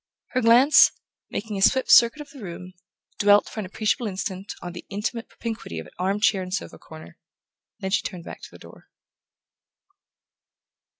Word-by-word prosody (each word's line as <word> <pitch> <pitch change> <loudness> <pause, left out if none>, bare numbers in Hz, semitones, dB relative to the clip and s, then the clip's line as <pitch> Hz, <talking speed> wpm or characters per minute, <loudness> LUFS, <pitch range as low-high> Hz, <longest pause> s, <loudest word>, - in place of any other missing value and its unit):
Her 255 - -1
glance, 245 +6 +6 0.4
making 210 -2 -4
a - - -5
swift 260 +6 +3
circuit 235 +6 +6
of 290 - -11
the 275 -4 -13
room, 180 -1 -8 0.5
dwelt 205 0 +5
for - - -8
an 200 - -4
appreciable 215 +4 -1
instant 190 0 -5
on 175 -1 -8
the 175 - -9
intimate 215 +4 -4
propinquity 225 - -6
of 80 -1 -7
arm 195 +3 0
chair 205 -3 +2
and 185 0 -7
sofa 85 - -5
corner; 80 +1 -13 0.6
then 190 - -3
she 190 - +2
turned 180 -4 -7
back - - -10
to - - -10
the - - -14
door. - - -16
205 Hz, 170 wpm, -24 LUFS, 185-230 Hz, 0.6 s, glance